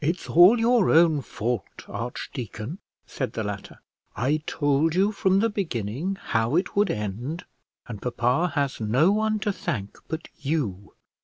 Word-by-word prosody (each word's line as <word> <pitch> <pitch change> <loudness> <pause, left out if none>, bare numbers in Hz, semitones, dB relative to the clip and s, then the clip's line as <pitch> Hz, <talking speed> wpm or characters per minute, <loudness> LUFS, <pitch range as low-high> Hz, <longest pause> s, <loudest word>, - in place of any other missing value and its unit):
"It's 165 +5 -1
all 180 +8 +7
your 230 -3 +3
own 160 -2 +5
fault, 115 -3 -4
archdeacon," 120 - -6 0.3
said 130 - -4
the 110 - -2
latter. 100 -1 -6 0.3
"I 140 +8 0
told 145 +2 +1
you 195 +3 +3
from 195 -1 +2
the 230 - +2
beginning 160 - -2
how 115 +5 0
it 180 - 0
would 205 0 +3
end, 115 - -4 0.4
and 105 -4 -7
papa 125 +7 0
has 140 -4 -1
no 130 - +3
one 215 +1 +1
to 205 0 0
thank 105 - -4
but 160 +1 -5
you." 115 - -2
145 Hz, 150 wpm, -25 LUFS, 115-185 Hz, 0.4 s, all